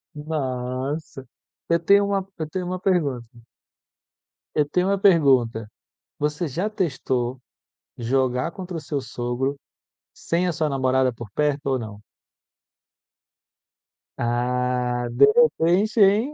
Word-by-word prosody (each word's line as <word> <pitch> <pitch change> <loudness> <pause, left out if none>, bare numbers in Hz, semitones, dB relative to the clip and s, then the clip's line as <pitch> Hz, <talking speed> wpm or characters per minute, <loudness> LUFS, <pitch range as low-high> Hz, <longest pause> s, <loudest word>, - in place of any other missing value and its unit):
Nossa, 135 -1 -4 0.4
eu 170 0 +3
tenho 200 +4 +4
uma 195 -1 -1
eu 155 -1 -4
tenho 185 +2 -3
uma 185 0 -3
pergunta. 150 -11 0 1.3
Eu 150 -1 +2
tenho 180 +4 +1
uma 200 -1 +1
pergunta, 130 - +3 0.5
você 150 +3 -1
já 175 +9 -2
testou 130 - -2 0.6
jogar 125 +4 0
contra 185 -1 -7
o 160 - -6
seu 145 -1 -3
sogro, 125 +3 -3 0.6
sem 170 +2 -1
a - - +1
sua 155 -1 0
namorada 130 -2 +1
por 115 -2 -9
perto 145 +1 -1
ou 130 -2 +1
não? 110 -2 -8 2.2
Ah 125 0 0
deu 275 - +5
pra 480 0 +6
preencher, 200 +7 +3
hein. 220 +9 +1
145 Hz, 120 wpm, -23 LUFS, 125-180 Hz, 2.2 s, pra